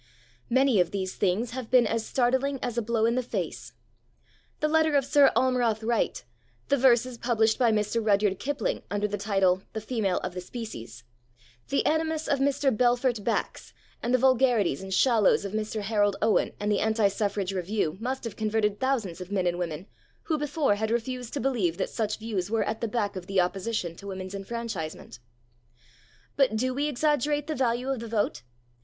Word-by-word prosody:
Many 260 -3 +3
of 175 -1 +3
these 190 -1 -3
things 205 +5 0
have 255 -2 -6
been 250 -1 +5
as 225 -1 -1
startling 260 +3 +1
as 245 -2 -2
a 235 - +1
blow 225 0 +1
in 230 - +2
the 255 - +1
face. 245 - -5 0.9
The 305 - +1
letter 315 -1 +3
of 275 -2 +3
Sir 285 0 +5
Almroth 245 -4 +2
Wright, 235 +1 0 0.5
the 280 - +4
verses 245 -1 +3
published 225 -2 +2
by 240 -3 +4
Mr. 215 +1 0
Rudyard 205 -2 +2
Kipling 290 +1 -2
under 205 0 0
the 205 -1 -4
title, 195 -3 +2
The 220 - -3
Female 215 -5 -1
of - - -3
the 180 - -5
Species, 125 - -8 0.7
the 275 - +1
animus 320 0 0
of 280 - +1
Mr. 275 -2 +2
Belfort 245 -1 +2
Bax - - -2 0.3
and 240 - -1
the 255 - +5
vulgarities 245 - +3
and 190 0 -8
shallows 220 -1 +3
of 200 - -5
Mr. 215 0 -2
Harold 205 -1 +1
Owen 220 - +2
and 210 0 -1
the 205 - +2
Anti 220 -1 +2
Suffrage 200 -1 -2
Review 185 -2 -1
must 260 +3 -3
have 230 - -5
converted 215 -1 0
thousands 225 -10 -1
of 180 +2 -8
men 190 -3 0
and 175 0 0
women 170 0 -4 0.4
who 315 -3 -1
before 295 -4 +1
had 215 +2 -2
refused 240 +1 -2
to - - -1
believe 220 -12 0
that - - -2
such 215 -2 -2
views 210 -5 -3
were 225 0 +1
at 220 - -3
the 230 - 0
back 210 -3 -2
of 180 -1 -7
the 195 -1 +1
opposition 185 -1 -1
to 200 - -10
women's 190 0 -6
enfranchisement. 195 - -5 1.2
But 270 -5 +3
do 255 +3 0
we 285 +3 0
exaggerate 295 0 +1
the 315 - -3
value 250 -1 0
of 265 - -2
the 230 - -6
vote? 210 - -1
225 Hz, 190 wpm, -27 LUFS, 200-255 Hz, 1.2 s, been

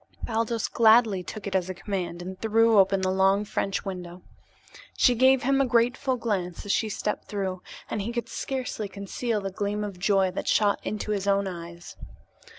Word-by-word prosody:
Baldos 230 0 -1
gladly 220 -4 +4
took 200 +4 -8
it 200 - -4
as 185 -1 0
a 185 - -4
command 175 -3 -4
and 185 +1 -8
threw 225 0 +4
open 195 0 +3
the 185 0 +1
long 195 +2 +3
French 195 -1 -2
window. 180 -2 -7 0.7
She 250 - +5
gave 260 +2 +4
him 275 +2 +3
a - - +3
grateful 245 +2 +1
glance 190 -7 -3
as 205 - -1
she 220 - +1
stepped 210 0 -3
through, 190 -3 -3 0.3
and 215 - -3
he 220 +4 -3
could 235 0 -3
scarcely 255 -5 -4
conceal 205 +3 -3
the 195 0 -4
gleam 205 +2 -2
of 200 -3 -6
joy 195 -1 +2
that 180 - -5
shot 205 -2 +3
into 215 0 -3
his 200 -1 -2
own 200 0 +2
eyes. 170 -2 -8
200 Hz, 185 wpm, -26 LUFS, 190-225 Hz, 0.7 s, She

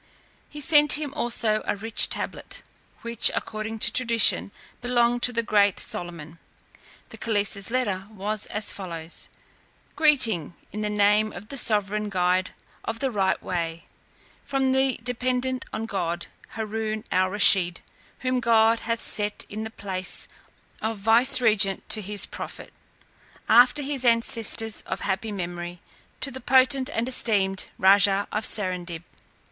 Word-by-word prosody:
He 295 - -9
sent 295 0 +6
him 290 -2 -3
also 235 -6 +1
a - - 0
rich 220 +3 +3
tablet, - - -3 0.4
which, 235 -1 +4
according 215 +1 -4
to - - +1
tradition, 230 -4 +3 0.3
belonged 240 -1 +1
to 245 - +5
the 235 -1 -1
great 205 -3 +2
Solomon. 170 -2 -5 0.7
The - - -12
caliph's 205 -2 0
letter 205 -6 -2
was 210 0 -1
as 210 0 -1
follows: 170 -4 -5 0.7
"Greeting, 230 - +2 0.2
in 210 - -5
the 210 - -2
name 210 +1 +2
of 200 +5 -11
the - - -6
sovereign 210 -1 +3
guide 180 -1 0 0.3
of 225 - -4
the 265 +1 -2
right 195 -3 0
way, 165 -2 -4 0.6
from 270 -1 0
the 265 0 +1
dependent 250 +1 -2
on 220 - -4
God, 175 -5 -3 0.3
Haroon 220 0 -4
al 185 0 +2
Rusheed, 185 -3 +2 0.4
whom 255 0 0
God 225 -1 +3
hath 230 0 -3
set 210 0 -3
in 215 +2 -5
the 220 - -6
place 190 -4 -4 0.5
of 220 0 -3
vicegerent 225 -2 +2
to 215 - +5
his 205 +1 +2
prophet, - - -9 0.7
after 250 +5 +5
his 275 -2 -2
ancestors 230 -2 +1
of - - -4
happy 205 +3 -3
memory, 175 -2 -6 0.4
to 275 - +3
the 260 - -9
potent 260 +2 +3
and 230 -2 -2
esteemed 200 -6 +1
Raja 200 +1 +4
of 215 +1 -1
Serendib. 180 -4 -2
215 Hz, 140 wpm, -24 LUFS, 195-240 Hz, 0.7 s, sent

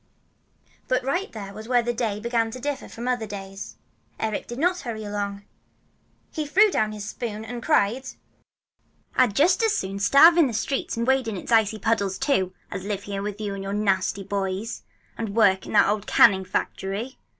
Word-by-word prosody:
But 255 0 +1
right 355 +9 -1
here 200 -1 -8
is 220 - -9
where 245 -1 +3
the 240 +1 -1
day 225 -4 -2
began 230 0 0
to 255 - -8
differ 280 +1 -4
from 235 +1 -7
other 245 -3 -1
days. 195 -1 -8 0.4
Eric 220 -2 -2
did 240 - -7
not 355 +5 +1
hurry 225 -4 -5
along. 205 -1 -4 0.9
He 310 -2 -3
threw 405 +7 +5
down 215 -8 +1
his 210 -1 -6
spoon 220 -1 -5
and 240 +1 -6
cried, 260 -3 +1 1.1
"I'd 250 -6 +3
just 355 - +4
as 445 -2 +2
soon 195 +1 -3
starve 280 +11 +7
in 330 -5 +6
the 240 - -4
streets, 245 +3 -2
and 230 - 0
wade 265 -1 +2
in 215 -3 -3
its 180 - -7
icy 220 -1 +3
puddles, 200 -3 0
too, 190 -11 +1 0.2
as 185 - -5
live 200 -1 -3
here 200 -1 -4
with 205 0 -5
you 205 -2 -3
and 195 - -5
your 195 +1 -4
nasty 195 -1 0
boys 195 +2 -3 0.4
and 220 -3 -3
work 190 -4 +3
in - - -7
that - - +6
old 210 0 -1
canning 190 -1 +5
factory! 195 +6 -3
220 Hz, 195 wpm, -24 LUFS, 200-255 Hz, 1.1 s, starve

